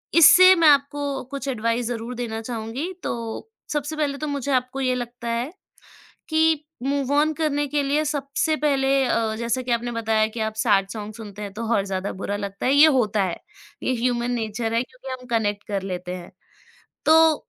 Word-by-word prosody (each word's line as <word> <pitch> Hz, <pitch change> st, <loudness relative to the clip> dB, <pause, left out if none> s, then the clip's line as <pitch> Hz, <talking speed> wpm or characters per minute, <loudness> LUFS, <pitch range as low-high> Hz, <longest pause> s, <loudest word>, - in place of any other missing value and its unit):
इससे 370 Hz, +3 st, +9 dB
मैं 330 Hz, -2 st, +4 dB
आपको 285 Hz, 0 st, +3 dB, 0.3 s
कुछ 280 Hz, 0 st, -5 dB
एडवाइस 230 Hz, 0 st, -1 dB
ज़रूर 240 Hz, 0 st, -4 dB
देना 230 Hz, -2 st, -4 dB
चहूँगी, 235 Hz, +8 st, -4 dB
तो 230 Hz, -, -4 dB, 0.2 s
सबसे 295 Hz, +1 st, -2 dB
पहले 285 Hz, -2 st, -1 dB
तो 305 Hz, -, -4 dB
मुझे 285 Hz, -1 st, -2 dB
आपको 255 Hz, +1 st, -1 dB
ये 255 Hz, -1 st, +1 dB
लगता 240 Hz, -1 st, -6 dB
है, 235 Hz, +5 st, -2 dB, 0.8 s
कि 315 Hz, -1 st, +2 dB, 0.2 s
मूव 280 Hz, 0 st, -1 dB
ऑन 305 Hz, +2 st, +3 dB
करने 290 Hz, -2 st, 0 dB
के 290 Hz, 0 st, 0 dB
लिए 295 Hz, +3 st, +1 dB
सबसे 290 Hz, +2 st, 0 dB
पहले 275 Hz, -3 st, +1 dB, 0.2 s
अ, 225 Hz, -3 st, 0 dB
जैसा 235 Hz, +2 st, -1 dB
कि 250 Hz, -, -6 dB
आपने 240 Hz, +1 st, -1 dB
बताया 220 Hz, -1 st, +1 dB
कि 230 Hz, -, -4 dB
आप 220 Hz, 0 st, -1 dB
सैड 200 Hz, -4 st, +2 dB
सॉन्ग 215 Hz, 0 st, -6 dB
सुनते 210 Hz, -2 st, -9 dB
हैं, 200 Hz, -, -6 dB
तो 230 Hz, -, -4 dB
और 195 Hz, -, +2 dB
ज़्यादा 190 Hz, 0 st, -3 dB
बुरा 205 Hz, -, -2 dB
लगता 200 Hz, +2 st, -4 dB
है, 265 Hz, -, +3 dB
ये 295 Hz, +2 st, +8 dB
होता 210 Hz, -3 st, +1 dB
है। 175 Hz, -, -2 dB, 0.5 s
ये 255 Hz, -, +1 dB
ह्यूमन 245 Hz, 0 st, 0 dB
नेचर 225 Hz, 0 st, -2 dB
है, 235 Hz, -, +2 dB
क्योंकि 255 Hz, +1 st, -13 dB
हम 250 Hz, -, -13 dB
कनेक्ट 210 Hz, -3 st, 0 dB
कर 200 Hz, -2 st, -2 dB
लेते 180 Hz, -1 st, -5 dB
हैं। 175 Hz, -, -10 dB, 0.8 s
तो 320 Hz, 0 st, +6 dB
245 Hz, 190 wpm, -23 LUFS, 220-285 Hz, 0.8 s, इससे